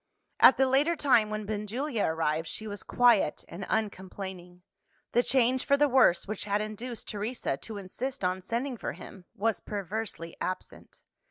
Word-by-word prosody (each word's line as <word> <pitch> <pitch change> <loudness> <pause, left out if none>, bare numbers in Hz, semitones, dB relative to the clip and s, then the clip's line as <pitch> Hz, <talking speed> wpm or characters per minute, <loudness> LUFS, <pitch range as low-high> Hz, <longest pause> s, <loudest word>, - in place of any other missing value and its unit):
At - - +8
the 265 - +4
later 285 +6 +3
time 245 -8 +3
when 215 0 -3
Benjulia 215 +4 -2
arrived, 160 0 0
she 220 - -5
was 205 -1 -6
quiet 235 -10 +3
and 185 +3 -7
uncomplaining. 190 -4 -4 0.5
The 240 - +4
change 255 0 +2
for 280 -1 +3
the 295 +1 +4
worse 255 -11 +4
which 215 0 -4
had 205 0 +1
induced 215 +3 -5
Teresa 210 - -2
to 215 +7 -8
insist 235 +6 -5
on 185 +1 0
sending 240 +6 -3
for - - -4
him, 190 -3 -12
was 225 +2 0
perversely 200 -4 -5
absent. 185 - -6
215 Hz, 160 wpm, -29 LUFS, 190-245 Hz, 0.5 s, At